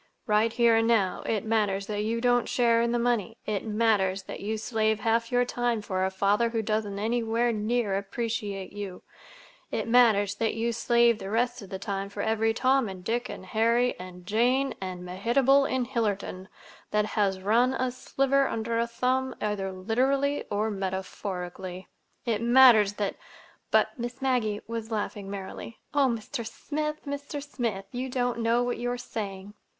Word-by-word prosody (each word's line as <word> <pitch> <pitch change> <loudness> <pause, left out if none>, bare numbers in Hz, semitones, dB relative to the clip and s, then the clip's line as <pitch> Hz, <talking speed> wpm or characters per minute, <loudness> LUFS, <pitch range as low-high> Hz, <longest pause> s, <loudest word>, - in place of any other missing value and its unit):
"Right 215 +1 +3
here 230 -1 +4
and 225 0 +2
now 200 -6 +2
it 220 -1 -1
matters 205 -3 +1
that 210 0 -2
you 230 +2 -1
don't 245 -1 +2
share 235 -2 +3
in 235 0 +1
the 240 - +1
money; 235 -2 0
it 210 -2 -2
matters 210 -3 +1
that - - -7
you 215 +2 -2
slave 220 -1 0
half 230 +1 +1
your 245 0 +3
time 240 -2 0
for 185 -2 -1
a 190 - +2
father 200 +4 +2
who 225 -1 -1
doesn't 215 -2 -1
anywhere 230 +2 +1
near 215 -1 0
appreciate 200 -1 -3
you; 200 -3 -7 0.7
it - - -2
matters 225 -4 +4
that 225 +2 -1
you 230 +1 0
slave 235 0 +3
the 195 - -6
rest 240 +3 0
of 195 - -10
the 190 - -4
time 195 0 -4
for 205 0 -4
every 225 0 +2
Tom 255 0 +2
and 185 -1 -8
Dick 235 +5 -1
and 185 - -7
Harry 230 +5 +2
and 180 -1 -10
Jane 245 +7 +2
and 180 -1 -5
Mehitable 245 +9 +3
in 260 -1 0
Hillerton 205 -6 -2 0.4
that 210 0 +1
has 200 -3 0
run 235 +7 +3
a 255 -1 0
sliver 275 +2 +1
under 230 +1 -1
a 235 - +1
thumb, 255 +2 0
either 205 -2 -2
literally 265 +9 0
or 215 +2 0
metaphorically. 190 -1 -5 0.4
It 225 -3 0
matters 235 -4 +7
that—" 205 -1 -2 0.5
But 285 - +2
Miss 240 +2 -5
Maggie 245 -6 0
was 230 -1 -5
laughing 205 -2 -3
merrily. 200 +3 -7 0.2
"Oh, 285 -2 +4
Mr. 235 0 -3
Smith, 300 +7 -4
Mr. 285 +1 -4
Smith, 225 -8 -3
you 255 +1 -3
don't 245 -2 -1
know 230 +1 +2
what 245 0 -1
you 245 0 -1
are 245 - -2
saying!" 205 -4 -6
225 Hz, 175 wpm, -27 LUFS, 200-245 Hz, 0.7 s, matters